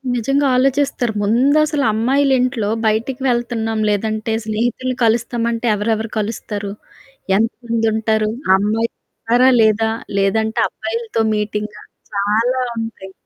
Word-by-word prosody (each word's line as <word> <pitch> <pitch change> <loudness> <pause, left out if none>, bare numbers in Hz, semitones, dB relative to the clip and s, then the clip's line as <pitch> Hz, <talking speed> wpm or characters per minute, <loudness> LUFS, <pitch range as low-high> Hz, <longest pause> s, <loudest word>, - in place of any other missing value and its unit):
నిజంగా 275 +5 +1
ఆలోచిస్తారు. 265 -2 +1
ముందసలు 285 +7 +2
అమ్మాయిలింట్లో 250 -1 +1 0.2
బయటికి 230 +5 -1
వెళ్తున్నాం 235 -2 -1
లేదంటే, 215 +2 -1
స్నేహితుల్ని 240 +4 -1
కలుస్తామంటే 235 +1 0
ఎవరెవరు 220 +2 -1
కలుస్తారు? 210 -1 -4 0.7
ఎంత 225 +2 +1 0.2
మందుంటారు? 220 -1 +1 0.2
ఆ - - +6
అమ్మాయిలున్నారా 230 +3 0
లేదా? 220 0 +3 0.3
లేదంటే, 220 +3 +1
అబ్బాయిలతో 225 0 -3
మీటింగా? 210 0 -3 0.3
చాలా 220 +6 +1 0.2
ఉంటాయి. 225 -4 -6
225 Hz, 95 wpm, -18 LUFS, 215-245 Hz, 0.7 s, ఆ